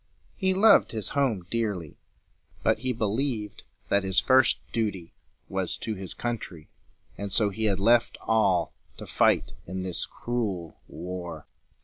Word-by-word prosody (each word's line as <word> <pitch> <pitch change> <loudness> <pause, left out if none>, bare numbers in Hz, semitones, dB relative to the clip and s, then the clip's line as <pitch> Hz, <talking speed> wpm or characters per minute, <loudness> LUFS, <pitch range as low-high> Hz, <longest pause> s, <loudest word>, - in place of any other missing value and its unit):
He 190 -2 +1
loved 205 - +6
his 110 -3 -2
home 125 -11 0
dearly, 100 -9 -2 0.6
but - - +2
he 130 0 -1
believed 110 -1 -2 0.3
that 100 0 +3
his 95 -1 +3
first 130 0 +5
duty 100 -7 -2 0.3
was 95 -2 -2
to 110 - -3
his 95 -3 -8
country; 100 -9 -5 0.5
and 100 -1 -4
so 105 0 +2
he 110 +3 -2
had 100 -3 +1
left 120 +4 +3
all, 100 -6 +2 0.2
to - - -8
fight - - +2
in 95 +1 -4
this 90 -2 -3
cruel 100 -9 -3
war. 85 -3 -6
105 Hz, 140 wpm, -27 LUFS, 95-120 Hz, 0.6 s, loved